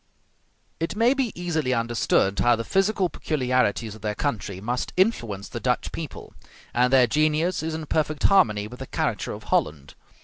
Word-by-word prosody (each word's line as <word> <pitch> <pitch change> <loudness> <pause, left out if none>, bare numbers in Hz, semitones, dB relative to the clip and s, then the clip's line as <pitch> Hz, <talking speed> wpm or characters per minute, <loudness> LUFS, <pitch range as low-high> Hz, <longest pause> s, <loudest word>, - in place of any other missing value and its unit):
It 165 +5 -2
may 230 +4 +4
be 265 -5 -1
easily 160 -7 0
understood 115 -4 +1
how 120 0 +4
the 115 - -4
physical 195 - +1
peculiarities 125 - 0
of 110 - -13
their 105 -1 -2
country 105 -9 -3
must 120 +5 -3
influence 115 - 0
the - - -6
Dutch - - -1
people; - - -7 0.4
and 125 +1 +3
their 130 -2 +6
genius 155 +7 +1
is 160 0 -3
in 160 -1 -5
perfect 155 0 -1
harmony 105 - +4
with 125 +3 -11
the 130 - -7
character - - -2
of - - -8
Holland. 70 -2 0
130 Hz, 170 wpm, -25 LUFS, 110-165 Hz, 0.4 s, their